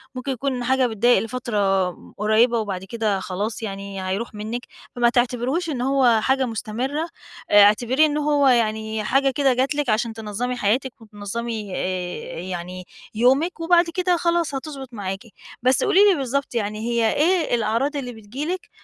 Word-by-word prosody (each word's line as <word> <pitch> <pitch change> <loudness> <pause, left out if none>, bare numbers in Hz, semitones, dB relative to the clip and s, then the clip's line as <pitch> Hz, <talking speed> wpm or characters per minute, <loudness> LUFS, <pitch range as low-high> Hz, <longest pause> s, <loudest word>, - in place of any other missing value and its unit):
ممكن 255 +2 -3
يكون 260 0 -2
حاجة 260 0 +2
بتضايق 235 +2 +3
لفترة 205 -6 0 0.3
قريّبة 225 +3 +3
وبعد 195 -4 -4
كده 210 0 -1
خلاص 200 +5 -4
يعني، 195 -2 -5
هيروح 200 +6 -3
منِك 215 +3 -4 0.3
فما 240 -1 +3
تعتبريهوش 250 +7 0
إن 260 -5 -3
هو 255 -4 +3
حاجة 265 +2 +2
مستمِّرة، 245 +7 -3 0.4
اعتبريه 220 +8 +5
إن 300 -1 0
هو 290 -1 +2
يعني 220 -3 +1
حاجة 270 +4 +2
كده 270 -1 +2
جَت 265 +3 0
لِك 290 -3 -1
عشان 225 +1 0
تنظّمي 225 +3 -3
حياتِك 245 +3 -1
وتنظّمي 215 0 -5
آآ، 180 -2 -4
يعني 180 0 -6 0.3
يومِك 270 +10 +2
وبعد 345 +1 +4
كده 360 -1 +2
خلاص 340 -3 0
هتضبُط 270 -2 -7
معاكِ. 195 -3 -4 0.4
بس 255 +1 +3
قولي 400 -2 +3
لي 365 - +1
بالضبط 275 -1 -2
يعني 215 -1 -2
هي 230 -1 +1
إيه 330 -3 +2
الأعراض 235 +6 0
اللي 255 -3 -4
بتيجي 225 +7 -6
لِك 365 +2 -4
240 Hz, 155 wpm, -22 LUFS, 210-270 Hz, 0.4 s, اعتبريه